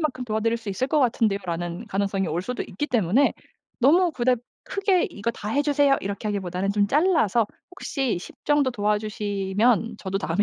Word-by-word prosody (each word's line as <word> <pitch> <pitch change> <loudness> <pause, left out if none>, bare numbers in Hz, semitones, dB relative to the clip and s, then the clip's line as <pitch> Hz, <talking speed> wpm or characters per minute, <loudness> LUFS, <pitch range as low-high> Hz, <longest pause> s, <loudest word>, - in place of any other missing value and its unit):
만큼 265 -5 -2
도와드릴 230 0 0
수 225 -3 -9
있을 200 +7 -1
것 300 +2 +2
같은데요."라는 195 -6 -1
가능성이 195 -2 -1
올 170 +4 -2
수도 250 +5 -3
있기 295 - -4
때문에 240 - +3 0.5
너무 335 +7 +4
그닥 250 -1 +1 0.3
크게 390 -2 +1
"이거 210 +3 -2
다 210 - -7
해주세요." 285 +1 +3
이렇게 200 +2 -4
하기보다는 195 -1 -2
좀 205 0 +2
잘라서 275 - +3 0.3
"혹시 270 - -2
10 - - -11
정도 290 -3 +3
도와주시면 210 +1 0
저도 195 0 -3
다음에 185 +2 0
220 Hz, 385 characters per minute, -24 LUFS, 200-270 Hz, 0.5 s, 너무